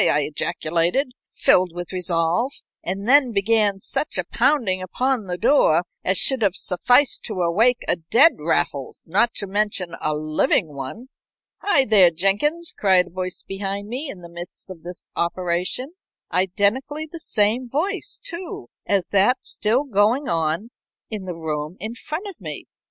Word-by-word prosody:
I 150 - +2
ejaculated, 170 - 0 0.2
filled 180 -2 +3
with 175 +1 -6
resolve, 180 +6 0 0.3
and 195 +4 -3
then 270 -1 +5
began 205 -1 +2
such 295 - -2
a 180 - +1
pounding 230 - +1
upon 240 +4 -1
the 180 0 -2
door 215 - +3 0.2
as 185 +1 +2
should 265 -3 +3
have 200 -3 +2
sufficed 245 +11 +2
to 210 -4 -3
awake 225 +9 +3
a - - +2
dead 235 - +4
Raffles, 150 -3 -1
not 205 +8 +2
to 200 - -1
mention 195 -3 -1
a 155 0 0
living 155 0 +1
one. 140 - -7 0.5
"Hi, 285 -10 +3
there, 200 -6 +7
Jenkins!" 205 - 0
cried 185 -3 +3
a - - -14
voice 185 0 -3
behind 200 +1 -4
me, 270 +5 -4
in 185 - -8
the 170 - -11
midst 175 +2 -6
of 170 -3 -11
this 175 +1 -8
operation, 180 - -1 0.4
identically 215 - 0
the 325 +2 -10
same 230 -1 +1
voice, 380 - -2
too, 345 - -6 0.2
as 195 -3 +1
that 205 +6 +2
still 230 +6 +1
going 240 +2 +1
on 165 +7 -1 0.4
in 210 -3 -5
the 180 -2 -5
room 155 +1 -4
in 220 +5 -4
front 310 - -6
of 375 - -10
me. 155 -4 -6
200 Hz, 155 wpm, -22 LUFS, 175-250 Hz, 0.5 s, there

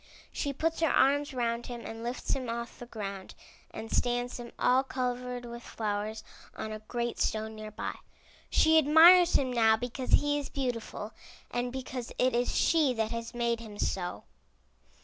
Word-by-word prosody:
She 285 - -2
puts 320 +4 -1
her 325 -2 +3
arms 285 +2 +3
around 235 -2 -2
him 240 -1 -6
and 225 +1 -7
lifts 240 +1 -3
him 255 -3 -3
off 235 0 -5
the 240 - -8
ground 200 -4 -6 0.3
and 225 - -8
stands 245 0 0
him, 235 -1 -8
all 255 +1 +4
covered 250 -1 -3
with 235 0 -8
flowers, 215 -1 -3 0.3
on 220 - -5
a 215 - -5
great 235 +2 -3
stone 220 0 -1
near 215 0 -7
by. 210 - -5 0.5
She 320 0 +5
admires 335 +4 +7
him 260 -2 +2
now 220 -2 +4
because 250 +2 -4
he 290 0 +4
is 285 - -6
beautiful, 235 -5 -4 0.4
and 245 0 -1
because 255 -1 -5
it 255 0 +2
is 245 +1 0
she 305 -6 +3
that 220 -1 -1
has 230 +1 -5
made 235 -1 0
him 215 -3 -10
so. 180 -3 -2
240 Hz, 170 wpm, -30 LUFS, 225-260 Hz, 0.5 s, admires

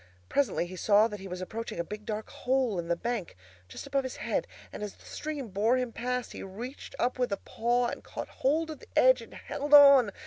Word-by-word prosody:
Presently 255 -10 +1
he 180 +1 -8
saw 205 +4 +4
that 210 -2 -7
he 195 - -8
was 180 0 -6
approaching 220 0 -5
a - - +1
big 210 +4 -8
dark 215 0 -3
hole 250 -6 0
in 170 - -4
the 170 - +1
bank, 230 -1 -3 0.3
just 90 - -8
above 275 -1 0
his 260 - -5
head, - - -2 0.3
and - - -7
as 210 -1 -5
the - - -20
stream 295 -6 -5
bore 215 +6 +2
him 250 -2 -2
past 250 +1 -3
he - - -8
reached 230 +8 -8
up 250 +1 0
with 250 -3 +1
a 200 - 0
paw 240 +2 0
and 240 - -4
caught - - -6
hold 315 +4 +2
of 305 - -8
the - - -16
edge - - +6
and - - -12
held 290 +1 +2
on. 280 -5 +9
235 Hz, 235 wpm, -29 LUFS, 205-265 Hz, 0.3 s, on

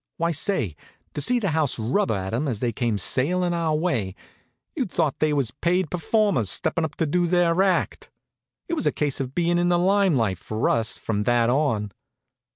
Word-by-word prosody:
Why 170 +1 0
say, 155 - 0 0.4
to 145 - -3
see 250 +10 +3
the 200 -7 -1
house 155 -4 0
rubber 125 - 0
at 95 +1 -4
'em 135 +6 -1
as 120 -6 -2
they 120 0 -1
came 115 -1 -1
sailin' 175 - +1
our 165 -2 0
way, 125 - -1 0.6
you'd 260 - -2
thought 160 -5 -1
they 155 0 +2
was 140 -6 0
paid 170 +3 -1
performers 180 - +1
stepping 165 - +1
up 150 -2 -4
to 165 - 0
do 175 +3 +1
their 175 0 +2
act. 190 -3 0 0.6
It 340 - -4
was 310 - -1
a - - +3
case 145 -2 -2
of 135 0 -5
bein' 175 0 +1
in 175 0 +1
the 175 - +3
lime 190 -1 +3
light 105 -7 0
for 110 +1 -1
us, 115 0 0
from 105 -2 -2
that 120 -1 +3
on. 115 -8 0
155 Hz, 200 wpm, -24 LUFS, 120-175 Hz, 0.6 s, see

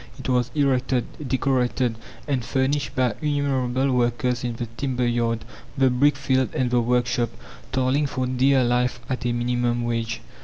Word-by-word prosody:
It 135 - -7
was 125 -2 +1
erected, 130 -3 +1 0.2
decorated 125 -2 +1 0.3
and 135 -4 0
furnished 140 +3 0
by 125 -3 +2
innumerable 135 -3 0
workers 120 0 0
in 120 -1 -2
the 120 - -3
timber 125 -2 -1
yard, 115 -1 0 0.3
the 135 -1 +4
brick 140 +3 +3
field, 130 -2 0
and 125 -1 0
the 120 -1 +3
workshop, 120 -1 +1 0.4
toiling 130 +3 +1
for 130 -2 -2
dear 130 +1 +3
life 125 0 +1
at 125 -1 -2
a - - +1
minimum 120 0 0
wage. 115 -1 -2
125 Hz, 155 wpm, -24 LUFS, 120-130 Hz, 0.4 s, the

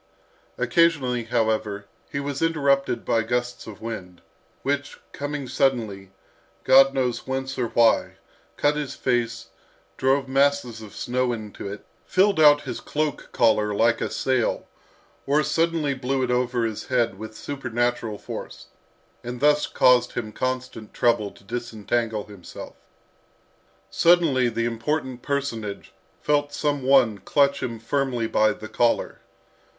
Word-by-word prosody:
Occasionally, 140 -9 +2
however, 110 -3 -1 0.3
he 140 - -2
was 140 -1 -4
interrupted 140 -6 +1
by 115 - +2
gusts 120 +2 -3
of 105 -3 -10
wind, 95 -6 -7 0.4
which, 145 +1 -2
coming 145 -1 -4
suddenly, 115 -7 0 0.5
God 135 +1 +6
knows 125 -2 -1
whence 135 0 -3
or 120 - +1
why, 115 0 +3 0.4
cut 145 0 +2
his 150 -3 -4
face, 115 -1 -1 0.5
drove 135 +1 +2
masses 135 -4 +1
of 105 -2 -11
snow 125 0 -1
into 105 -3 -7
it, 100 - -9 0.2
filled 195 0 +2
out 145 -1 +7
his - - -5
cloak 150 -1 -3
collar 110 -4 +2
like 115 +2 +2
a - - -1
sail, 130 -3 0 0.6
or 150 +2 +3
suddenly 165 -3 +1
blew 130 0 -1
it 125 - 0
over 125 -1 +1
his 110 -2 -4
head 120 -6 0
with 110 0 -8
supernatural 120 -5 -2
force, - - -8 0.5
and 120 0 -6
thus 150 +2 +3
caused 125 -1 +4
him 110 -2 -4
constant 130 -2 -4
trouble 115 -4 +2
to - - -20
disentangle 115 0 -2
himself. 100 -4 -11 1.2
Suddenly 165 -8 +4
the 115 0 -2
important 125 +2 -2
personage 120 -8 -3 0.3
felt 145 -1 +1
some 145 -2 0
one 130 -6 +4
clutch 140 +5 +2
him 115 -2 -3
firmly 125 0 -1
by 110 -1 +3
the 110 - -7
collar. 120 +1 0
125 Hz, 135 wpm, -24 LUFS, 115-140 Hz, 1.2 s, out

